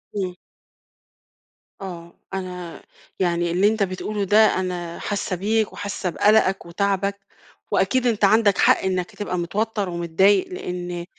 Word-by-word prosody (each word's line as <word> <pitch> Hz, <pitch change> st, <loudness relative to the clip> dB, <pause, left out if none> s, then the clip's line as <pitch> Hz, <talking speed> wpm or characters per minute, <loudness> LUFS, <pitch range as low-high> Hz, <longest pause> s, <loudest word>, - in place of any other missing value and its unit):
إمم. 185 Hz, -3 st, -2 dB, 1.5 s
آه، 170 Hz, -3 st, -9 dB
أنا 180 Hz, -3 st, -6 dB, 0.4 s
يعني 175 Hz, -2 st, +1 dB
اللي 190 Hz, +4 st, +3 dB
أنتَ 215 Hz, -1 st, +1 dB
بتقوله 200 Hz, +2 st, -3 dB
ده، 205 Hz, +3 st, +3 dB, 0.2 s
أنا 175 Hz, -2 st, -4 dB
حاسَّة 200 Hz, -2 st, -2 dB
بيك 215 Hz, +4 st, 0 dB
وحاسَّة 200 Hz, -2 st, -4 dB
بقلقَك 200 Hz, +1 st, +3 dB
وتعَبَك، 200 Hz, +2 st, -1 dB, 0.5 s
وأكيد 255 Hz, -1 st, +2 dB
أنتَ 215 Hz, -3 st, +2 dB
عندَك 205 Hz, -1 st, +4 dB
حق -, -, +5 dB
إنَّك 185 Hz, -2 st, -1 dB
هتبقى 205 Hz, -3 st, -4 dB
متوتّر 205 Hz, +3 st, -2 dB
ومتضايِق، 175 Hz, -, +2 dB
لإن 175 Hz, -, -5 dB
190 Hz, 125 wpm, -22 LUFS, 175-205 Hz, 1.5 s, حق